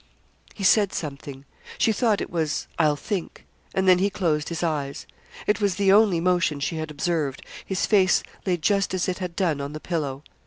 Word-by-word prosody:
He 200 - -6
said 200 0 +4
something. 140 -2 -6 0.3
She 225 - +3
thought 215 -1 +1
it - - -5
was 160 -3 -1
'I'll 155 -2 +4
think;' 180 +5 -5 0.3
and 190 0 +1
then 180 -1 +6
he 200 +2 +2
closed 160 -6 -1
his 170 0 -3
eyes. 145 -4 -2 0.4
It 210 +1 +1
was 200 -3 +1
the 195 0 +3
only 205 -5 +5
motion 175 -4 +1
she 160 +3 -2
had 155 0 -4
observed, 150 -3 -2 0.2
his 190 -1 -1
face 190 -4 +3 0.2
lay 180 -3 0
just 195 +3 +1
as 185 - -1
it 185 0 -2
had 180 -2 -5
done 160 -7 0
on 140 +1 -5
the 155 - -6
pillow. 150 -5 -3
175 Hz, 195 wpm, -24 LUFS, 150-190 Hz, 0.4 s, then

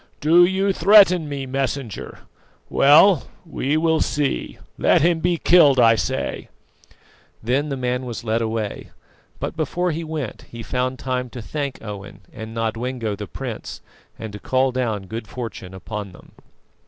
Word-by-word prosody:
"Do 170 +4 +6
you 190 +2 +1
threaten 185 -4 +5
me, 140 -2 -4
Messenger? 135 -3 -4 0.5
Well, 155 +4 +6 0.2
we 150 -2 -1
will 160 0 +2
see. 145 -2 -1 0.2
Let - - +4
him 170 -1 +3
be 175 +1 +1
killed, 155 -6 +5
I 115 -1 +6
say." 130 +3 -3 0.9
Then 135 +6 0
the 135 - -3
man 125 0 -2
was 120 -2 -6
led 115 0 0
away; 110 -2 -3 0.5
but, - - -4
before 170 +3 -1
he 165 +2 -4
went 155 -7 -5
he 115 0 -8
found 130 +1 -2
time 125 -1 -3
to 120 - -8
thank 140 0 -5
Owen 105 -2 -8
and 110 0 -8
Nodwengo 115 0 -2
the 105 0 -7
prince, - - -7 0.4
and 110 -2 -7
to 105 - -7
call 130 +4 +1
down 115 -6 -2
good 110 +3 -7
fortune 110 -6 -7
upon 100 0 -7
them. - - -17
130 Hz, 155 wpm, -22 LUFS, 115-155 Hz, 0.9 s, Do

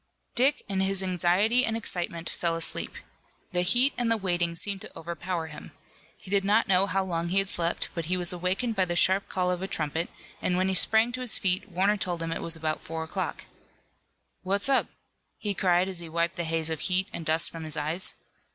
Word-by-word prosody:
Dick, 270 +4 +3
in 195 -1 -2
his 190 0 +2
anxiety 185 +7 +2
and 225 -2 0
excitement, 170 -5 -1
fell 170 -1 -1
asleep. 165 0 -3 0.6
The 180 -1 +1
heat 245 +10 +5
and 240 -2 +1
the 230 - +3
waiting 175 -4 -1
seemed 195 +3 0
to - - -11
overpower 170 +1 -4
him. 155 -1 -11 0.4
He 190 - -13
did 200 -1 +2
not 210 +3 +3
know 190 +1 +3
how 195 0 0
long 170 -2 -2
he 185 +3 -1
had 195 0 +2
slept, 170 0 0
but 170 -2 -3
he 180 +3 -1
was 180 0 0
awakened 185 +7 -1
by 190 -2 +2
the 175 -1 -3
sharp 190 +3 +3
call 180 -1 0
of 180 0 -2
a 190 - -3
trumpet, 160 0 -2 0.3
and 180 - 0
when 185 +1 +1
he - - 0
sprang 220 +5 +3
to 255 +1 -4
his 250 -3 +2
feet 190 +2 +1
Warner 195 +3 +1
told 175 -4 -2
him 165 - -3
it - - -3
was 165 - 0
about 155 -1 -3
four 160 0 -5
o'clock. 160 - -4 1.0
"What's 200 +6 +1
up?" 270 - +3 0.5
he 205 -2 -2
cried, 180 -1 +2
as 185 -2 0
he 170 -1 -6
wiped 170 +3 -1
the 170 - -1
haze 160 0 0
of 160 - -3
heat 185 +3 +3
and 170 - -5
dust 160 +1 +2
from 165 -1 -8
his 155 0 +1
eyes. 155 +5 +1
180 Hz, 220 wpm, -27 LUFS, 170-195 Hz, 1.0 s, heat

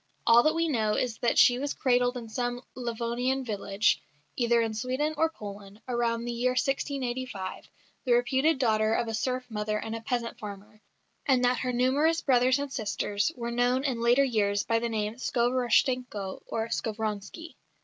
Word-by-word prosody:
All 235 +1 +7
that 310 +5 +2
we 330 0 +1
know 220 -7 +1
is 240 -3 -2
that 240 - +1
she 245 0 +6
was 285 +1 -3
cradled 245 -1 +2
in 235 -2 -7
some 245 +2 -3
Livonian 245 +2 -2
village, 205 -1 0 0.3
either 235 -1 +2
in 225 -1 0
Sweden 260 +7 -1
or 320 +2 +2
Poland, 205 -6 -10
about 235 -2 0
the 240 - -2
year 245 +2 0
1685, 255 -6 -2 0.4
the 250 - +3
reputed 265 +6 +2
daughter 220 -3 +2
of 235 - 0
a 225 - -3
serf 250 +3 -1
mother 210 0 -1
and 225 +1 -4
a 225 - -6
peasant 235 0 -3
father; 210 +1 -9 0.5
and 255 -3 +4
that 245 -1 +2
her 255 - -1
numerous 275 +7 +2
brothers 255 0 +3
and 285 -1 -4
sisters 205 +1 -1
were 235 -1 -4
known 245 +2 +1
in 255 -5 -1
later 240 +4 +4
years 205 -5 +1
by 230 0 +1
the 235 0 -2
name 215 0 -2
Skovoroshtchenko 245 -4 0
or 225 0 -3
Skovronski. 220 - -4
240 Hz, 170 wpm, -28 LUFS, 220-255 Hz, 0.5 s, All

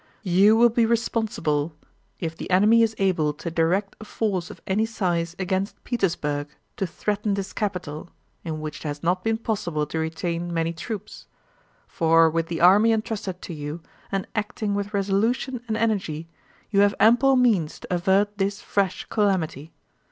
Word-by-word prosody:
You 195 +3 +5
will 240 +1 +6
be 235 +1 +2
responsible 210 -10 0 0.4
if 165 -2 -3
the - - -7
enemy 210 +5 +5
is 225 -1 +2
able 170 -6 +1
to 160 +3 -6
direct 175 +5 +1
a - - -6
force 200 -5 -2
of - - -11
any 200 +3 +1
size 175 -6 -1
against 190 +1 -2
Petersburg 150 - -1 0.3
to 195 - -1
threaten 205 +3 -1
this 195 0 -4
capital 180 -5 -4 0.3
in 155 -2 -4
which 155 0 -5
it - - -6
has 145 0 -5
not 180 +2 +1
been 225 0 +1
possible 175 -9 -2
to 160 +2 -4
retain 170 +2 -3
many 165 0 -1
troops; 210 +4 -7 0.6
for 165 0 +4
with 165 0 -1
the 165 -1 -3
army 200 +6 +6
entrusted 215 -4 -3
to 175 - -6
you, 150 +1 -5 0.3
and 195 -1 -1
acting 210 -1 -2
with 200 0 -2
resolution 220 +6 0
and 220 -1 -1
energy, 190 -8 -1 0.4
you 200 - +3
have 200 0 +4
ample 245 +5 +5
means 215 -11 +2
to - - -5
avert 195 +3 +1
this 195 +1 0
fresh 195 -2 -1
calamity. 170 -7 -1
190 Hz, 165 wpm, -24 LUFS, 165-215 Hz, 0.6 s, will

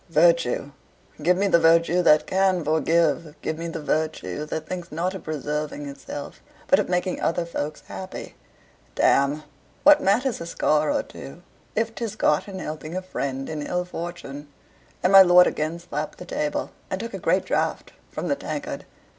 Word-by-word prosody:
Virtue! 165 -4 +3 0.5
give 180 +4 +3
me 200 - +2
the 170 -4 +4
virtue 165 +2 +4
that 150 -3 +5
can 185 -3 +1
forgive; 160 0 +1
give 160 0 -2
me 170 - -3
the 165 -2 -5
virtue 150 - -2
that 155 +1 -4
thinks 180 -1 -6
not 175 +4 -1
of 190 - -7
preserving 150 -1 -3
itself, 140 +1 -8 0.2
but 185 - +4
of 205 - -1
making 180 +1 -1
other 170 +1 0
folks 155 -2 -4
happy. 190 0 -8 0.6
Damme, 140 +2 +3 0.4
what 295 0 +7
matters 235 +3 +1
a 170 - -5
scar 155 -2 +1
or - - 0
two 170 +6 -11 0.3
if 225 +1 0
'tis 225 -3 -4
got 215 - +2
in 195 -2 -7
helping 155 0 -5
a - - -2
friend 135 -7 -4
in 155 -1 -4
ill 180 +4 -2
fortune?" 170 -5 -7 0.6
And 180 - +3
my 195 - +11
lord 180 -1 +7
again 155 +2 -1
slapped 155 -3 -5
the 180 - -9
table, 150 -4 -2 0.2
and 190 - -2
took 230 +2 -6
a - - -4
great - - +1
draught - - -1 0.2
from - - -4
the - - +1
tankard. - - -5
170 Hz, 175 wpm, -24 LUFS, 150-185 Hz, 0.6 s, my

